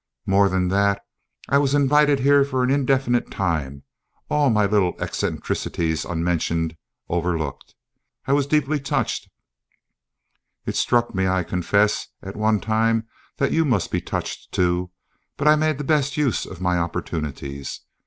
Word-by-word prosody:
More 100 +1 +4
than 90 -1 0
that, 100 +1 +1 0.4
I 140 - +3
was 140 0 +2
invited 145 0 +4
here 140 +1 +5
for 130 -2 -1
an 125 - +2
indefinite 135 -3 +1
time, 75 -7 -2 0.5
all 150 -2 +3
my 105 -3 +3
little 100 -3 +1
eccentricities 80 -2 -2
unmentioned, 85 -1 -1 0.3
overlooked. 85 -5 -3 0.5
I 140 - +1
was 140 -1 +2
deeply 150 0 +1
touched 140 - -2 1.4
(it - - -3
struck 120 -1 +1
me, 95 -1 +1
I 95 0 +1
confess, 100 +5 +1 0.2
at 95 +1 -7
one 110 0 +2
time 115 +1 +1 0.3
that 140 - +1
you 165 - +3
must 120 - 0
be - - 0
touched - - -5
too), 90 0 0 0.5
but 145 - 0
I 150 - +7
made 155 -1 +1
the 145 - -4
best 145 0 +1
use 145 -6 0
of 95 - -9
my 90 -1 +1
opportunities. 70 -4 -4
105 Hz, 145 wpm, -23 LUFS, 90-140 Hz, 1.4 s, I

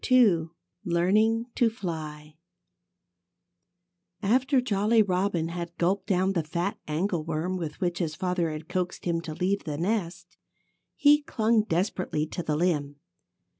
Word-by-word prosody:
II 200 -11 +5 0.3
LEARNING 210 +7 +2
TO 235 - +3
FLY 155 -7 -6 1.9
After 260 +6 +3
Jolly 220 -1 +3
Robin 180 -3 0
had 170 0 -6
gulped 190 +4 0
down 190 -1 +2
the 170 - +1
fat 175 +7 -3
angleworm 165 +1 -1
with 165 -5 -5
which 175 -2 -1
his 160 -4 -2
father 180 -2 0
had 155 +1 -6
coaxed 180 -1 -3
him 170 -1 0
to 160 -2 -6
leave 190 +4 0
the 150 -2 -3
nest, 180 0 -2 0.6
he 295 0 +5
clung 225 -6 +2
desperately 175 -4 -1
to 165 - -5
the 155 -3 -1
limb. 150 -4 0
180 Hz, 130 wpm, -27 LUFS, 165-205 Hz, 1.9 s, II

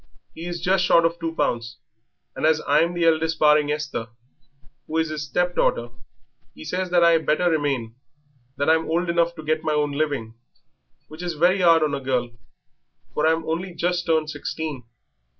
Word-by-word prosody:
He 165 +2 -8
is 175 0 -4
just 185 +1 +2
short 170 -2 +4
of 165 +1 -1
two 165 0 -4
pounds, 115 -3 -2 0.6
and - - -6
as 155 0 +4
I'm 160 +4 +2
the 170 -1 +1
eldest 160 0 +2
barring 150 -1 +4
Esther, 150 -6 -3 0.8
who 160 - -3
is 160 -1 0
'is 155 -1 -4
step 180 +4 0
daughter, 120 0 +1 0.7
'e 80 - -11
says 185 - -3
that 175 -1 +3
I 170 - +6
had 165 -1 +2
better 175 +3 +2
remain, 140 -7 -1 0.6
that 145 - -1
I'm 160 0 +2
old 170 +1 0
enough 170 0 +1
to 155 - -9
get 155 +1 -1
my 155 - 0
own 150 -1 0
living, 140 -6 -2 0.7
which 155 +2 -11
is 175 -1 -3
very 180 +5 +3
'ard 165 -2 +5
on 150 -2 0
a 140 - -2
girl, 125 -2 -1 0.8
for 150 - +1
I'm 160 0 +1
only 170 +3 -3
just 175 +1 -1
turned 160 -1 +1
sixteen. 145 -3 -5
160 Hz, 185 wpm, -23 LUFS, 150-170 Hz, 0.8 s, I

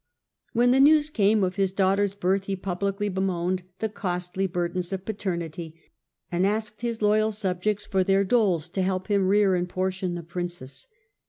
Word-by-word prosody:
When 245 +1 +4
the 260 - +4
news 300 +2 +5
came 210 -3 +3
of 185 +1 -1
his 195 -2 +2
daughter's 195 +1 +1
birth 195 0 0
he 195 - -2
publicly 195 +2 -2
bemoaned 185 -1 -1 0.2
the 220 - -1
costly 185 -2 -3
burdens 175 0 -2
of 190 0 -4
paternity, 170 -6 -4 0.6
and 175 +1 +1
asked 215 +2 -1
his 235 -2 -3
loyal 215 +1 +3
subjects 205 0 -2
for 190 -1 +1
theii 195 +1 +2
doles 185 -8 +2
to 190 +2 -2
help 185 +1 -1
him 200 -2 +2
rear 200 0 +4
and 180 0 -1
portion 185 0 -2
the 170 - -6
princess. 175 -5 -6
190 Hz, 170 wpm, -26 LUFS, 180-205 Hz, 0.6 s, news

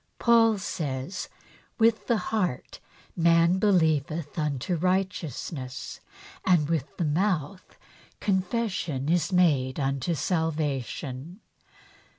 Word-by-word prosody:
Paul 230 -2 +4
says: 150 -2 -4 0.2
" - - -27
With 225 -1 +3
the 235 - +3
heart 190 - -2 0.4
man 170 +2 +4
believeth 160 -6 +1
unto 150 +2 -1
righteousness, 170 -7 -2 0.4
and 170 -6 +3
with 150 -4 -2
the 170 - 0
mouth 175 +1 -1 0.4
confession 190 - -1
is 175 +2 +1
made 150 -8 +2
unto 135 +4 -1
salvation." 150 - -2
165 Hz, 95 wpm, -27 LUFS, 140-185 Hz, 0.4 s, Paul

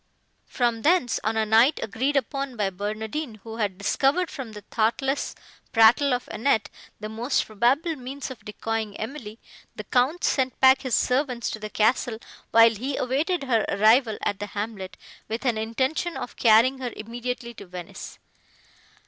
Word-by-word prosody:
From 235 -2 0
thence, 310 -4 +2
on 220 +1 0
a 220 - +2
night 225 +7 +4
agreed 260 +7 -1
upon 275 0 -2
by 205 -3 -1
Barnardine, 215 +7 -4
who 225 0 -8
had 205 -4 -1
discovered 275 - +1
from 265 -7 -7
the 210 - -9
thoughtless 265 +5 0 0.4
prattle 235 +5 +5
of 245 0 -1
Annette, 225 -2 0 0.3
the 215 - -5
most 230 +5 -1
probable 255 - +1
means 265 +1 -7
of 255 - -11
decoying 220 0 -4
Emily, 225 -2 -7 0.4
the - - -6
Count 265 +8 +1
sent 260 -2 0
back 265 0 +6
his 260 -3 0
servants 250 -2 0
to 215 - -6
the 215 0 -6
castle, 220 +2 +1 0.3
while 230 0 +6
he 260 +6 -4
awaited 290 +6 0
her 235 -5 +2
arrival 220 +3 +4
at 205 -1 -1
the 205 - -4
hamlet, 205 -2 -6 0.3
with 225 +4 -4
an 245 -3 +2
intention 260 +10 -1
of - - -6
carrying 235 +4 +4
her 250 -2 -4
immediately 235 +2 -5
to 210 - -11
Venice. 180 -1 -9
235 Hz, 160 wpm, -25 LUFS, 220-265 Hz, 0.4 s, back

